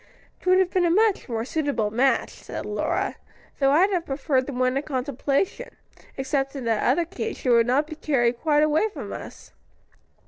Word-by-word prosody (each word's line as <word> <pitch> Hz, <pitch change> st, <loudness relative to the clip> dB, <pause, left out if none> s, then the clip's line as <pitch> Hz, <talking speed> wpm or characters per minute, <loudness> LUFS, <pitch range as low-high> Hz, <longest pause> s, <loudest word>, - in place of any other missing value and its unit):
"'Twould 370 Hz, 0 st, +4 dB
have 375 Hz, -1 st, +2 dB
been 370 Hz, -, +2 dB
a 345 Hz, -, +3 dB
much 415 Hz, -2 st, +2 dB
more 225 Hz, -1 st, -2 dB
suitable 275 Hz, -8 st, -1 dB
match," 260 Hz, +4 st, +2 dB
said -, -, -8 dB
Lora. -, -, -2 dB, 0.4 s
"Though 275 Hz, -1 st, +4 dB
I'd 350 Hz, +8 st, +4 dB
have 350 Hz, -3 st, -1 dB
preferred 270 Hz, -1 st, 0 dB
the -, -, -4 dB
one 255 Hz, 0 st, 0 dB
in 275 Hz, -, +1 dB
contemplation, 285 Hz, -, -2 dB, 0.4 s
except 270 Hz, 0 st, -1 dB
that -, -, -6 dB
in 260 Hz, -, -6 dB
the 230 Hz, -, +1 dB
other 295 Hz, +8 st, +2 dB
case, -, -, -5 dB
she 255 Hz, -, -3 dB
would 235 Hz, -1 st, +5 dB
not 270 Hz, +5 st, +2 dB
be 310 Hz, -, -8 dB
carried 245 Hz, -6 st, 0 dB
quite 300 Hz, -2 st, +3 dB
away 310 Hz, +8 st, +2 dB
from -, -, -7 dB
us. -, -, -10 dB
280 Hz, 195 wpm, -24 LUFS, 255-330 Hz, 0.4 s, would